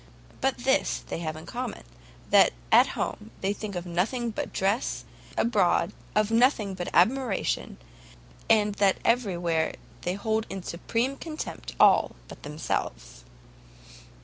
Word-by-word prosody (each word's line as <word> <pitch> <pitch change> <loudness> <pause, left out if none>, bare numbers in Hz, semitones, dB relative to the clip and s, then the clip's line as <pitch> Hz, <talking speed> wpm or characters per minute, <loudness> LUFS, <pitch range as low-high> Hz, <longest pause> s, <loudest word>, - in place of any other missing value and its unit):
But - - +1
this - - +1
they - - -3
have 155 -2 -3
in 155 - -9
common, 245 -2 -5 0.5
that - - +6 0.2
at - - +7
home 105 - -3
they 195 +1 +1
think 205 -2 -6
of 175 0 -4
nothing 220 +8 -1
but - - -4
dress, 200 +6 0 0.3
abroad, 200 -4 +2 0.2
of 215 +1 +2
nothing 225 -4 +3
but 180 -2 -4
admiration, 230 +3 +1 0.7
and 210 -2 +4
that 195 -1 +4
every 230 -6 +2
where 165 -2 0 0.3
they 180 +1 -2
hold 220 +2 -1
in 190 -2 -5
supreme 235 +11 -2
contempt 315 -2 -6
all - - +5
but - - -11
themselves." 145 - -4
200 Hz, 135 wpm, -27 LUFS, 175-230 Hz, 0.7 s, at